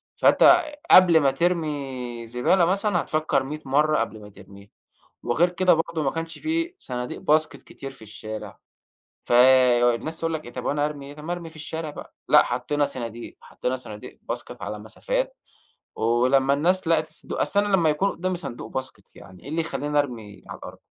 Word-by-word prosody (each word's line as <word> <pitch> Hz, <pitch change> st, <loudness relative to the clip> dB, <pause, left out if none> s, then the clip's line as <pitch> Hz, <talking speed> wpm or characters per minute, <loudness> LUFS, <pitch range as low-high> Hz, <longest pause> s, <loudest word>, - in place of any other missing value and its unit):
فأنت 350 Hz, -1 st, +6 dB, 0.3 s
قبل 175 Hz, -3 st, +8 dB
ما 135 Hz, -2 st, +3 dB
ترمي 135 Hz, -8 st, -2 dB
زبالة 125 Hz, +10 st, +2 dB
مثلًا، 195 Hz, 0 st, +1 dB
هتفكر 155 Hz, -2 st, 0 dB
مِيّة 150 Hz, +3 st, -6 dB
مرة 150 Hz, +3 st, +2 dB
قبل 110 Hz, -1 st, -3 dB
ما 105 Hz, -, -11 dB
ترميها، 100 Hz, 0 st, -15 dB, 0.5 s
وغير 160 Hz, +9 st, +2 dB
كده 180 Hz, 0 st, +3 dB
برضه 165 Hz, -1 st, -2 dB
ما 135 Hz, -, +1 dB
كانش 165 Hz, 0 st, -5 dB
في 330 Hz, +3 st, -2 dB
صناديق 125 Hz, 0 st, -5 dB
باسكت 155 Hz, +1 st, +1 dB
كتير 135 Hz, -, -9 dB
في 135 Hz, -4 st, -15 dB
الشارع. 110 Hz, 0 st, -8 dB, 0.7 s
فالناس 125 Hz, +3 st, +4 dB
تقول 165 Hz, 0 st, -1 dB
لك 155 Hz, -, -4 dB
إيه 120 Hz, -, -10 dB
"طب 125 Hz, -, -6 dB
وأنا 145 Hz, 0 st, 0 dB
هارمي 145 Hz, -2 st, -4 dB
إيه 145 Hz, -, -10 dB
طب 150 Hz, -, -10 dB
ما 175 Hz, -, -3 dB
أرمي 170 Hz, -2 st, -6 dB
في 160 Hz, -, -16 dB
الشارع 155 Hz, +1 st, -5 dB
بقى" -, -, -11 dB
لأ، -, -, +7 dB
حطينا 145 Hz, 0 st, -1 dB
صناديق 120 Hz, -4 st, -6 dB
حطينا 130 Hz, +1 st, -4 dB
صناديق 105 Hz, -4 st, -10 dB
باسكت -, -, -6 dB
على 105 Hz, -, -5 dB
مسافات، -, -, -3 dB, 0.6 s
ولما 130 Hz, +4 st, +2 dB
الناس 175 Hz, +4 st, +1 dB
لقت 160 Hz, -1 st, +2 dB
الصندوق 155 Hz, -, -7 dB
أصل 200 Hz, -, +2 dB
أنا -, -, -2 dB
لما 165 Hz, -3 st, +3 dB
يكون 170 Hz, +7 st, +1 dB
قدامي 185 Hz, +1 st, -3 dB
صندوق 120 Hz, -10 st, -7 dB
باسكت 130 Hz, 0 st, -6 dB
يعني 90 Hz, -1 st, -14 dB
إيه -, -, -11 dB
اللي 160 Hz, +2 st, -1 dB
يخليني 150 Hz, -2 st, -2 dB
أرمي 115 Hz, -8 st, -3 dB
على -, -, -8 dB
الأرض؟ -, -, -10 dB
145 Hz, 180 wpm, -24 LUFS, 125-165 Hz, 0.7 s, قبل